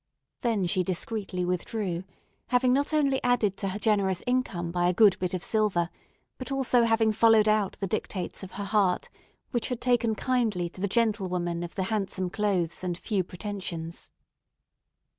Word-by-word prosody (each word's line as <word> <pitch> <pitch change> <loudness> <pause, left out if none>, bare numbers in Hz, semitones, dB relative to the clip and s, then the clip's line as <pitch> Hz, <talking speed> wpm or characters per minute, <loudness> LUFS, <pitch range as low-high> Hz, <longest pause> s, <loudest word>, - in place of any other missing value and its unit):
Then 225 -7 +1
she 180 +1 +1
discreetly 185 0 -1
withdrew, 180 0 -2 0.4
having 250 +1 +3
not 285 +3 +1
only 280 -3 +2
added 240 -5 +2
to 195 - -1
her 190 +1 -2
generous 200 -3 +1
income 220 -9 -1
by 175 0 +2
a 180 - 0
good 210 -2 +6
bit 180 0 -1
of 180 - -4
silver, 195 -6 +1 0.5
but 255 +1 -6
also 255 -3 +3
having 225 -1 +3
followed 220 0 +5
out 215 -2 +2
the 195 - -4
dictates 190 -1 -2
of 190 -2 -9
her 205 - -4
heart, 200 -3 +1 0.4
which 240 -3 -1
had 250 -2 -3
taken 240 -3 +2
kindly 220 -9 0
to 185 - -12
the 200 - +1
gentle 215 -2 +1
woman 175 -1 -2
of 175 0 -6
the 190 - -1
handsome 190 -3 -1
clothes 190 -6 -1
and 175 -2 -2
few 195 0 -1
pretensions. 180 -3 -5
200 Hz, 170 wpm, -27 LUFS, 180-230 Hz, 0.5 s, good